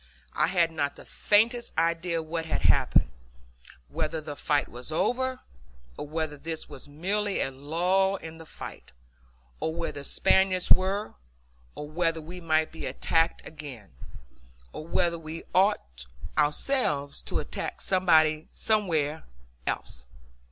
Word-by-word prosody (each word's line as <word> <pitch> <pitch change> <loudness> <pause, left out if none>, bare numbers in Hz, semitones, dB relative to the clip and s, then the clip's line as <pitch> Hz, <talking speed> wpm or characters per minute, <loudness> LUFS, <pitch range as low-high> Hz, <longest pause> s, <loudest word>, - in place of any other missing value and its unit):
I - - +3
had 170 -3 +3
not 145 -3 -1
the - - -13
faintest 235 +3 +2
idea 165 0 +1
what 165 +1 -3
had - - -1
happened: 60 - +4 0.8
whether 155 - -2
the 150 -1 -6
fight 145 0 +1
was 125 +5 -8
over; 255 +9 0 0.5
or 145 - -6
whether 155 -1 -2
this 160 +2 -5
was 135 - -10
merely 195 +7 -1
a 135 - 0
lull 175 +8 +1
in 165 -3 -8
the 160 - -11
fight; - - -9 0.7
or 160 - -2
where 170 0 -2
the 140 - -8
Spaniards 190 +3 +3
were; 195 +3 +3 0.6
or 150 - -6
whether 165 +1 0
we 175 +3 -9
might 155 -1 +2
be 160 - -5
attacked 165 0 +1
again; 140 - -9 0.8
or 155 - -7
whether 170 0 +1
we 160 +1 -7
ought 70 - +1 0.3
ourselves 150 - +1
to - - -3
attack - - -4
somebody 160 -4 +3
somewhere 160 -9 +2 0.5
else. 65 - -2
165 Hz, 135 wpm, -28 LUFS, 150-185 Hz, 0.8 s, happened